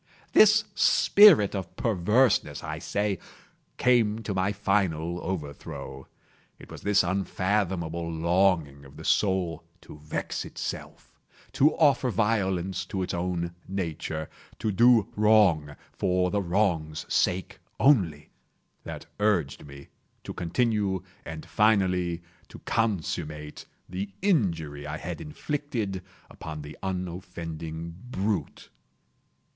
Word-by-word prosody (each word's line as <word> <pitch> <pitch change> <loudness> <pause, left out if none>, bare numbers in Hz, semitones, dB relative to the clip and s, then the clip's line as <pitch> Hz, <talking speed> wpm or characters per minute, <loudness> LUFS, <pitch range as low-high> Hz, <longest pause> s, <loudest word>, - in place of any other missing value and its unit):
This 215 0 +7
spirit 200 - +6
of 95 -4 -5
perverseness, 105 - +2
I - - -4
say, 100 -3 -1 0.6
came 115 -3 +2
to 105 - -3
my 95 +1 +1
final 90 -5 0
overthrow. 75 -5 -6 0.5
It - - -14
was - - -9
this 100 -2 +3
unfathomable 90 -2 -1
longing 85 -4 +1
of 70 -1 -15
the - - -9
soul 90 -5 +1 0.2
to 75 - -12
vex 75 +1 -4
itself—to 150 +4 -3
offer 140 -5 +3
violence 95 -5 0
to 95 -1 -2
its - - -4
own 85 -1 -2
nature—to 85 +2 -4
do 115 +1 +5
wrong 100 -9 +4 0.2
for 90 0 +1
the 100 - +1
wrong's 85 -5 0
sake 90 -1 0 0.2
only—that 95 - -1
urged 90 -10 0
me 70 0 -12 0.3
to - - -6
continue 100 0 0 0.2
and 80 -1 -7
finally 90 -5 +2 0.2
to - - -12
consummate 80 -8 -2 0.2
the 95 +2 -4
injury 80 - 0
I 75 +1 -4
had 85 0 -6
inflicted 145 - -3 0.3
upon 75 -2 -8
the 75 +1 -9
unoffending 85 -3 -5 0.2
brute. 100 - -2
95 Hz, 105 wpm, -27 LUFS, 80-105 Hz, 0.6 s, This